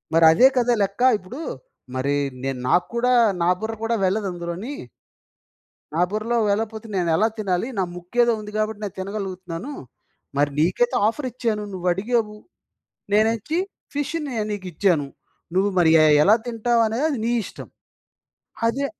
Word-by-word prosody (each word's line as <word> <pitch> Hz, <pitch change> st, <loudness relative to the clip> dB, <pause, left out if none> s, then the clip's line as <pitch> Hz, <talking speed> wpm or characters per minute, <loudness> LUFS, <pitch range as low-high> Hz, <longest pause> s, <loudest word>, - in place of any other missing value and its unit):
మరదే 165 Hz, +9 st, +7 dB
కదా 245 Hz, 0 st, +3 dB
లెక్కా, 200 Hz, +6 st, +2 dB
ఇప్పుడూ 240 Hz, -, -9 dB, 0.5 s
మరీ 140 Hz, +2 st, 0 dB, 0.3 s
నేను 135 Hz, -2 st, -2 dB
నాకు 175 Hz, +4 st, +3 dB
కూడా 250 Hz, +1 st, +2 dB, 0.3 s
నా -, -, +2 dB
బుర్ర 220 Hz, +1 st, -3 dB
కూడా 230 Hz, +1 st, +1 dB
వెళ్ళదందులోని. 185 Hz, +3 st, -3 dB, 1.2 s
నా 165 Hz, -, +1 dB
బుర్రలో 215 Hz, +3 st, -1 dB
వెళ్ళపోతే 220 Hz, +1 st, -2 dB
నేనెలా 175 Hz, +4 st, +2 dB
తినాలి, 190 Hz, 0 st, 0 dB
నా -, -, +3 dB
ముక్కేదో 235 Hz, +7 st, +1 dB
ఉంది 210 Hz, 0 st, -9 dB
గాబట్టి 215 Hz, 0 st, -1 dB
నేను 200 Hz, -1 st, -5 dB
తినగలుగుతున్నాను. 190 Hz, -, -5 dB, 0.6 s
మరి 145 Hz, +1 st, +2 dB
నీకైతే 180 Hz, +10 st, +2 dB
ఆఫరిచ్చాను. 235 Hz, -4 st, -2 dB
నువ్వడిగావు, 210 Hz, +5 st, 0 dB, 0.8 s
నేనెచ్చి 225 Hz, +8 st, +2 dB, 0.4 s
ఫిష్ష్‌నే 290 Hz, -3 st, -3 dB
నీకిచ్చాను. 180 Hz, -6 st, 0 dB, 0.5 s
నువ్వు 195 Hz, +2 st, +3 dB
మరి 165 Hz, -, +5 dB
ఎ -, -, +6 dB, 0.2 s
ఎలా 210 Hz, +3 st, +6 dB
తింటావనేది 230 Hz, +2 st, +1 dB
అది 280 Hz, -, -1 dB
నీ 235 Hz, -, +1 dB
ఇష్టం. -, -, -9 dB, 1.0 s
అదే 270 Hz, +5 st, 0 dB
210 Hz, 125 wpm, -23 LUFS, 180-235 Hz, 1.2 s, మరదే